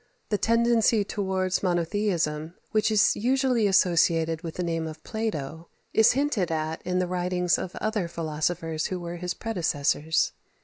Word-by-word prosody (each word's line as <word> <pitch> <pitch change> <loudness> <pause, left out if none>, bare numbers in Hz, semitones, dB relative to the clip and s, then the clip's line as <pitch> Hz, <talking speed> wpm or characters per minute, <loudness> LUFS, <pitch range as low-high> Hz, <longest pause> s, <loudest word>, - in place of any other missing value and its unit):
The 210 - +1
tendency 230 -1 +3
towards 190 -2 -1
monotheism 170 -3 -1 0.2
which 215 -1 +2
is 215 -1 +4
usually 250 -1 +2
associated 165 -3 +3
with 165 -2 -6
the 180 - -2
name 165 -1 -2
of 155 -1 -9
Plato 165 -8 -4 0.3
is 220 +1 +5
hinted 255 - 0
at 160 0 -2
in 180 0 -2
the 185 - +2
writings 180 0 0
of 185 - -6
other 215 -4 -1
philosophers 160 0 -2
who 185 - -4
were 175 0 -6
his 180 0 -3
predecessors. 160 -6 0
180 Hz, 145 wpm, -26 LUFS, 165-210 Hz, 0.3 s, is